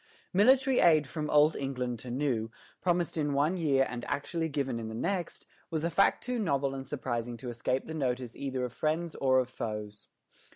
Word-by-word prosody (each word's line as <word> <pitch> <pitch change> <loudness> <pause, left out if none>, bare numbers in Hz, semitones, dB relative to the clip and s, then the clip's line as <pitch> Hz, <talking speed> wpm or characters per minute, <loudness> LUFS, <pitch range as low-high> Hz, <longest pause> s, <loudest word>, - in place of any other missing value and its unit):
Military 260 +6 +5
aid 155 -4 +5
from 150 +2 -4
Old 150 +1 +5
England 125 -3 -3
to 125 - -9
New, 120 -4 -1 0.3
promised 175 -2 0
in 145 -2 0
one 150 +6 +2
year 140 -6 +3
and 120 -1 -6
actually 160 +3 -2
given 135 -5 -2
in 115 - -5
the 110 - -6
next, 175 - -2 0.2
was 160 -1 -2
a 170 - 0
fact 195 - +3
too 250 -1 -2
novel 140 -8 0
and 135 -1 -6
surprising 120 -4 -3
to 125 +2 -6
escape 120 +2 -1
the 160 - -6
notice 125 -5 -2
either 130 -2 -2
of 120 - -7
friends 155 +5 -1
or 130 -1 +2
of 130 -1 +2
foes. 105 -4 -6
140 Hz, 195 wpm, -30 LUFS, 125-160 Hz, 0.3 s, Military